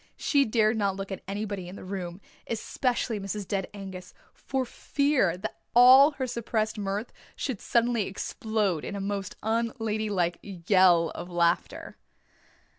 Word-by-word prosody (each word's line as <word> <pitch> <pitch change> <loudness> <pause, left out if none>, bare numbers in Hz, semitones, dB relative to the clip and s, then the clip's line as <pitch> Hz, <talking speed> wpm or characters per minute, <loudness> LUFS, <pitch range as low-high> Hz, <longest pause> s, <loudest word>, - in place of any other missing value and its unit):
She 280 -2 +2
dared 220 0 +2
not 200 -2 +1
look 195 0 -6
at 190 - -5
anybody 200 -2 -4
in 180 - -8
the - - -10
room, 185 -1 -6 0.3
especially 235 0 -1
Mrs. 195 0 -5
Dead 195 -2 -1
Angus, 190 -3 -9 0.2
for 265 -1 -3
fear 255 - 0 0.4
all 260 +5 +8
her 265 -2 -3
suppressed 230 -2 -2
mirth 200 +3 -3 0.2
should 260 -8 -4
suddenly 235 -3 +1
explode 200 -3 -2
in - - -5
a - - -4
most 195 -1 -3
un 225 +2 +1
young 230 - -11
ladylike 210 -6 -1
yell 180 -3 +3
of 175 - -7
laughter. 170 -1 0
205 Hz, 145 wpm, -27 LUFS, 190-230 Hz, 0.4 s, all